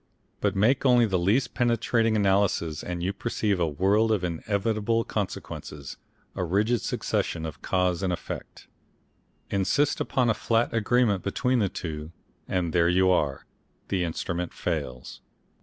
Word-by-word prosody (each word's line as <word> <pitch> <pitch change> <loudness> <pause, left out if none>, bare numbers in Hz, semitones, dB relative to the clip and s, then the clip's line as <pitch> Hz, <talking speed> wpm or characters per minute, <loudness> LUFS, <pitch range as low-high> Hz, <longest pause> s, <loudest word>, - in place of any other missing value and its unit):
But - - 0
make 115 +7 +3
only 125 -3 +5
the 95 -4 0
least 110 +8 +1
penetrating 115 -2 +2
of 105 - +2
analyses 95 -5 +1
and 90 -1 -4
you 95 +2 0
perceive 105 -3 -1
a 85 - +2
world 100 +8 +2
of 105 -4 +1
inevitable 105 +6 0
consequences, 75 - -5 0.4
a - - -2
rigid 105 +6 +1
succession 80 -1 -2
of 80 -3 -7
cause 90 -2 0
and 95 -2 0
effect. 90 - -6 0.9
Insist 100 +9 +1
upon 125 -2 +1
a 115 - +4
flat 115 +2 0
agreement 115 -2 +2
between 125 +5 0
the 100 -3 +1
two, 80 -2 -6 0.4
and 90 -3 -1
there 85 -1 +4
you 95 +1 +4
are! 70 -6 0 0.4
The 95 -2 0
Instrument 85 +1 -3
fails. 60 0 -4
95 Hz, 145 wpm, -26 LUFS, 85-115 Hz, 0.9 s, only